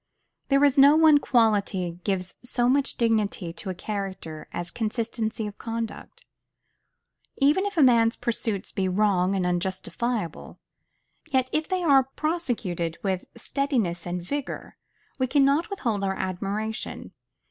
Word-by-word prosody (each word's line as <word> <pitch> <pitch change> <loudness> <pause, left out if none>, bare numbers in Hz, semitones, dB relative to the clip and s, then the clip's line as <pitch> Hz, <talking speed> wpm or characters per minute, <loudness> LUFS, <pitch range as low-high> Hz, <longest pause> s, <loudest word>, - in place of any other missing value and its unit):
There 275 0 +3
is 285 -1 +4
no 280 +2 +8
one 315 -2 +6
quality 200 -9 +1
gives 185 -2 -1
so 245 0 0
much 270 +2 +2
dignity 215 -6 0
to 190 +3 -6
a 185 - -3
character 190 -6 -5
as 175 0 -4
consistency 225 -1 -2
of 210 0 -8
conduct. 230 - -6 1.1
Even 300 +9 +3
if 400 - -6
a 310 - +6
man's 230 -3 +5
pursuits 225 -4 -2
be 190 -1 -1
wrong 190 -1 +2
and 185 -2 0
unjustifiable, 185 +3 -3 0.7
yet 260 -3 +1
if 310 0 0
they 370 -1 -1
are 270 -4 +4
prosecuted 225 - -2
with 190 -2 -1
steadiness 235 - -1
and 175 0 -3
vigor, 285 +9 -5 0.4
we 260 - +2
cannot 280 +4 +3
withhold 230 - -2
our 190 -1 0
admiration. 200 +5 -4
225 Hz, 135 wpm, -26 LUFS, 190-275 Hz, 1.1 s, no